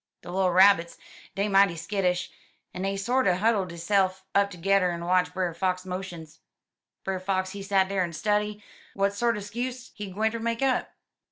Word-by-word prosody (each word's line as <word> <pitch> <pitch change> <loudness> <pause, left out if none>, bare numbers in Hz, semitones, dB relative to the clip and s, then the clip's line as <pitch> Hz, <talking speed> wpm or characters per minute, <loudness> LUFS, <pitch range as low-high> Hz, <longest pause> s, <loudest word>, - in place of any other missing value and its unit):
De 175 - -8
little 185 0 +2
Rabbits, 185 -2 +5 0.4
dey 200 +1 0
mighty 195 -3 +4
skittish, 180 +1 -1 0.4
en 180 - -5
dey 195 +1 -1
sorter 230 -2 +2
huddle 205 0 +1
deyse'f 185 +2 0
up 200 0 +3
tergedder 185 0 +2
en 170 0 -5
watch 180 0 +2
Brer 180 -2 -2
Fox 185 +2 -1
motions. 175 -4 -7 0.6
Brer 190 -1 -2
Fox, 185 0 -1
he 200 - -7
set 195 -1 +2
dar 195 -1 -1
en 170 - -3
study 210 +5 -1 0.3
w'at 200 0 +1
sorter 230 0 0
*skuse 245 +4 -5
he 205 -1 -7
gwinter 220 +4 -1
make 230 +2 -1
up. 260 -2 +1
195 Hz, 170 wpm, -27 LUFS, 180-205 Hz, 0.6 s, Rabbits